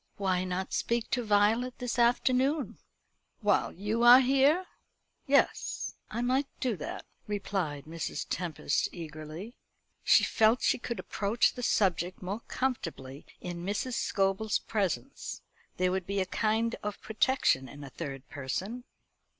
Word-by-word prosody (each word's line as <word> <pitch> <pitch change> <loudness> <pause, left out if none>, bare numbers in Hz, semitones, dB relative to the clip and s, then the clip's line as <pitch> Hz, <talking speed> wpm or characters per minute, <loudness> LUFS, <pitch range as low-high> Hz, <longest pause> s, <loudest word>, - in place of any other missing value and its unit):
"Why 185 -2 +1
not 185 +1 -3
speak 235 0 -1
to 245 - +1
Violet 220 +4 +2
this 245 -1 -3
afternoon?" 255 +4 +2 0.6
"While 205 -2 +2
you 210 +5 -2
are 240 +1 +10
here? 275 +7 +4 0.6
Yes, 280 +1 +1 0.2
I 235 +2 -2
might 260 +3 +1
do 245 -4 0
that," 150 - -6 0.2
replied 190 -8 -2
Mrs. 165 +1 -4
Tempest 165 -4 -1
eagerly. 160 +5 -8 0.5
She - - +6
felt 225 +3 +3
she - - +3
could 235 -1 -4
approach 215 +4 +1
the 250 - -7
subject 185 -6 +1
more 200 +5 -3
comfortably 165 - -3
in 175 -1 -5
Mrs. 205 +6 -2
Scobel's 195 0 +1
presence. 190 - -3 0.3
There 185 0 +2
would 185 -1 -2
be 200 0 -1
a 190 - +1
kind 220 +4 0
of 210 -1 -4
protection 220 - +1
in 145 0 -10
a 135 - -9
third 140 -3 -6
person. 190 - -4
205 Hz, 135 wpm, -30 LUFS, 175-240 Hz, 0.6 s, are